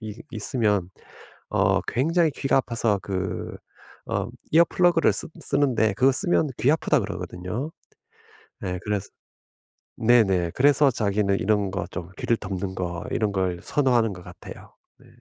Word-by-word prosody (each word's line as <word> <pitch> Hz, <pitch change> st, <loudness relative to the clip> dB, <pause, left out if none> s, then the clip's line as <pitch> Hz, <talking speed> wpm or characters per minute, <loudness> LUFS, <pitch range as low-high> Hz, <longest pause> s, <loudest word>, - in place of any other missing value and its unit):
이 110 Hz, 0 st, -8 dB
있으면 105 Hz, -4 st, +1 dB, 0.6 s
어 -, -, +2 dB
굉장히 165 Hz, +6 st, +1 dB
귀가 135 Hz, -1 st, 0 dB
아파서 115 Hz, -5 st, 0 dB
그 95 Hz, 0 st, -4 dB, 0.5 s
어 -, -, -1 dB, 0.3 s
이어 165 Hz, +2 st, +7 dB
플러그를 175 Hz, -2 st, +3 dB
쓰 -, -, -2 dB
쓰는데 130 Hz, -7 st, +1 dB
그거 130 Hz, +6 st, +4 dB
쓰면 175 Hz, -1 st, +2 dB
귀 135 Hz, -, +2 dB
아프다고 160 Hz, -, +1 dB
그러거든요. 105 Hz, -, -5 dB, 0.9 s
네 90 Hz, -1 st, -4 dB
그래서 105 Hz, -2 st, -2 dB, 0.9 s
네네 100 Hz, -7 st, +3 dB
그래서 145 Hz, +1 st, +4 dB
자기는 100 Hz, -3 st, 0 dB
이런 105 Hz, -1 st, +1 dB
거 95 Hz, -2 st, -3 dB
좀 85 Hz, 0 st, -6 dB
귀를 115 Hz, -, +1 dB
덮는 95 Hz, -2 st, -5 dB
거 90 Hz, -2 st, -4 dB
이런 110 Hz, -2 st, 0 dB
걸 95 Hz, -2 st, -1 dB
선호하는 120 Hz, -7 st, +1 dB
것 90 Hz, -, -10 dB
같아요. -, -, -12 dB, 0.2 s
네. -, -, -21 dB
110 Hz, 285 characters per minute, -24 LUFS, 95-135 Hz, 0.9 s, 이어